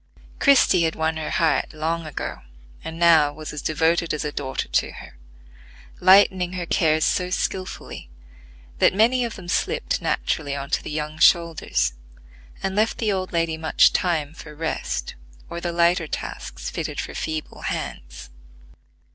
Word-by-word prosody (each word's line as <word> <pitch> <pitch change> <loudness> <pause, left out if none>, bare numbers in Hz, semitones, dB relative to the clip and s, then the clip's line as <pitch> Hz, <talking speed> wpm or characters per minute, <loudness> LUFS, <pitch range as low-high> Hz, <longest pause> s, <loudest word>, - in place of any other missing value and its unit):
Christie 270 -10 +5
had 160 -1 +1
won 160 0 0
her 155 - -4
heart 165 -1 +1
long 160 +1 -2
ago, 150 - -5 0.4
and 160 0 -6
now 165 -4 +5
was 155 +1 -8
as 150 - -5
devoted 165 +1 +1
as 150 - -4
a 150 - -2
daughter 135 -2 -3
to - - 0
her; - - -12 0.8
lightening 185 -1 +5
her 180 -1 -3
cares 155 -1 +2
so 180 -1 0
skilfully 185 - -4 0.7
that - - +4
many 240 +4 +3
of 235 -2 -4
them 185 -2 -10
slipped - - -1
naturally 140 -2 -1
on 140 0 -6
to - - +1
the - - -7
young 150 0 -4
shoulders, 150 - +3 0.7
and 195 0 -1
left 215 +2 +1
the 220 -3 0
old 185 -1 -2
lady 165 -1 0
much 160 -1 +4
time 160 -5 0
for 150 -2 -11
rest, 160 +1 -3 0.4
or 170 0 -5
the 175 - -2
lighter 170 -1 +2
tasks - - -6
fitted - - -4
for - - -5
feeble 155 -1 -5
hands. 60 0 -6
165 Hz, 155 wpm, -23 LUFS, 155-180 Hz, 0.8 s, Christie